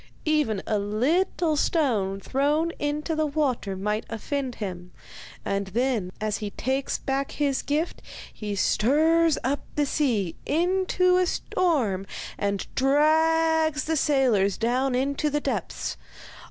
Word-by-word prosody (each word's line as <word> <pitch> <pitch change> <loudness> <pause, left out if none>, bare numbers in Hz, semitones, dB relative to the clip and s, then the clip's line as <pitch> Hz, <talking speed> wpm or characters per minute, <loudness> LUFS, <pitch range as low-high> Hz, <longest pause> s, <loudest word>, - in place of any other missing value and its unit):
Even 300 -11 +1
a 215 - 0
little 305 - +1
stone 230 - +1
thrown 295 - 0
into 300 +2 -1
the 310 0 +1
water 270 -9 -1
might 210 +3 -1
offend 255 +3 -3
him, 180 -4 -6 0.5
and 200 0 -1
then 225 -2 -1
as 215 -1 -1
he 210 -2 -4
takes 265 +6 -2
back 270 0 -2
his 280 -2 0
gift, 305 +4 -2 0.3
he 210 -2 -4
stirs 315 +10 +3
up 275 +3 0 0.2
the 295 - +2
sea 230 - 0
into 365 +2 +2
a 365 -1 +2
storm 245 - 0 0.3
and 200 -1 -1
drags 315 +2 +3
the 320 - -1
sailors 255 -10 +2
down 250 +3 +1
into 280 +3 0
the 295 0 0
depths. - - -3
275 Hz, 125 wpm, -25 LUFS, 215-310 Hz, 0.5 s, stirs